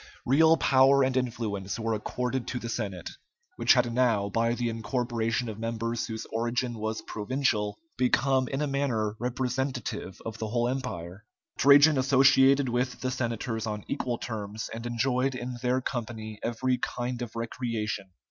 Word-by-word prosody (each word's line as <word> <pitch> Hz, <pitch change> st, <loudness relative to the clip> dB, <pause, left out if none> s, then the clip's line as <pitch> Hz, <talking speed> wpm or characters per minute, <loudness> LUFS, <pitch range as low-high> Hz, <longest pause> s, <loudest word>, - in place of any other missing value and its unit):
Real 160 Hz, +5 st, +5 dB
power 135 Hz, 0 st, +5 dB
and 130 Hz, 0 st, +1 dB
influence 110 Hz, -6 st, -2 dB
were 115 Hz, 0 st, -1 dB
accorded 125 Hz, +4 st, -2 dB
to 125 Hz, -, -3 dB
the 115 Hz, -1 st, -5 dB
Senate, 100 Hz, -7 st, -4 dB, 0.5 s
which -, -, +5 dB
had 120 Hz, -2 st, +2 dB
now, 115 Hz, -5 st, +2 dB
by 115 Hz, +3 st, +1 dB
the 120 Hz, 0 st, -1 dB
incorporation 115 Hz, 0 st, -1 dB
of 110 Hz, -1 st, -6 dB
members 115 Hz, +1 st, -2 dB
whose 110 Hz, -2 st, -5 dB
origin 120 Hz, +2 st, -1 dB
was 110 Hz, +1 st, -3 dB
provincial, 105 Hz, -3 st, -1 dB, 0.2 s
become 130 Hz, +1 st, +2 dB
in 135 Hz, +3 st, -2 dB
a -, -, 0 dB
manner 125 Hz, -7 st, 0 dB
representative 125 Hz, -4 st, -3 dB
of 115 Hz, 0 st, -6 dB
the 110 Hz, -, -2 dB
whole 120 Hz, +2 st, 0 dB
empire. 105 Hz, -8 st, -4 dB, 0.4 s
Trajan 145 Hz, +1 st, +7 dB
associated 135 Hz, +1 st, +5 dB
with 125 Hz, +1 st, -1 dB
the 130 Hz, -, -1 dB
senators 115 Hz, -2 st, -2 dB
on 105 Hz, -1 st, -4 dB
equal 125 Hz, -4 st, -2 dB
terms, 110 Hz, -2 st, -5 dB
and 115 Hz, +1 st, -5 dB
enjoyed 125 Hz, +2 st, 0 dB
in 125 Hz, 0 st, -5 dB
their 125 Hz, +1 st, +1 dB
company 110 Hz, -4 st, -5 dB
every 125 Hz, +2 st, 0 dB
kind 125 Hz, 0 st, -3 dB
of 120 Hz, -2 st, -6 dB
recreation. 115 Hz, -4 st, -3 dB
120 Hz, 155 wpm, -28 LUFS, 110-130 Hz, 0.5 s, Trajan